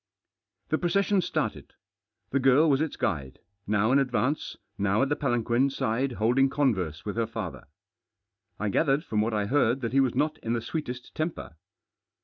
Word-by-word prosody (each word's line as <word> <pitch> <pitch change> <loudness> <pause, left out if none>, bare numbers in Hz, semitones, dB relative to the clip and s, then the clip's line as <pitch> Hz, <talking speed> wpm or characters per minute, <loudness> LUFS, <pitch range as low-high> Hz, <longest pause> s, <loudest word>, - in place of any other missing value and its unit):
The 155 - +1
procession 200 +2 +2
started. - - -3 0.6
The 140 - +2
girl 135 +4 +5
Was 140 -1 +3
its 160 - -2
guide, 70 -8 -2 0.3
now 105 +4 +2
ih 140 - +5
advance, 130 +2 -1 0.2
how 100 +4 +2
at 135 - 0
the 145 - +1
palanquin 120 -1 +1
side 130 0 -1
holding 125 +5 +2
converse 100 - 0
with 105 +1 -4
her 115 -1 +1
father. 110 -6 -6 0.9
I 105 +1 -1
gathered 140 - +2
froni 110 -10 -1
What 110 +1 0
I 105 -1 0
heard 130 +1 +2
that 115 0 -3
he 135 - +4
was 130 -3 +2
not 155 +1 0
in 115 - -2
the 120 - -1
sweetest 125 -1 -5
temper. 155 - -4
125 Hz, 170 wpm, -27 LUFS, 110-140 Hz, 0.9 s, girl